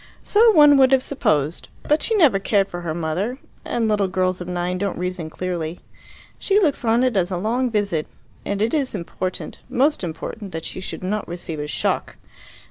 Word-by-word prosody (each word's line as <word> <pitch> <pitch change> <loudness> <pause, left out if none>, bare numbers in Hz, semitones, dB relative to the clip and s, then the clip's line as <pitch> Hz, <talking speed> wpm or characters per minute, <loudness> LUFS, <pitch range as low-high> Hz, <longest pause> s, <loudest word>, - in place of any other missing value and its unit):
"So 450 +3 +5
one 295 -4 +7
would 265 -1 +5
have 260 -1 +4
supposed. 155 - 0
But 300 +1 +2
she 450 - +1
never 290 - +5
cared 200 0 +1
for 175 - -6
her 160 -2 -3
mother, 175 +9 -2 0.3
and 230 -2 -1
little 205 -2 +2
girls 185 -1 0
of 180 - -6
nine 180 0 -2
don't 200 0 -2
reason 180 -2 -3
clearly. 175 -1 -4 0.6
She 400 +1 +3
looks 310 -11 +1
on 230 +2 +3
it 255 -3 +1
as 180 -2 +2
a 185 - -2
long 240 +7 0
visit. 200 -8 -1 0.4
And 200 +1 -1
it 225 - 0
is 275 -7 0
important, 185 0 -5
most 280 -1 +1
important, 180 +4 -6
that 160 0 -5
she - - -6
should 185 - -6
not 210 +3 -2
receive 170 -2 -6
a 150 - -3
shock. - - -2
195 Hz, 195 wpm, -22 LUFS, 175-250 Hz, 0.6 s, one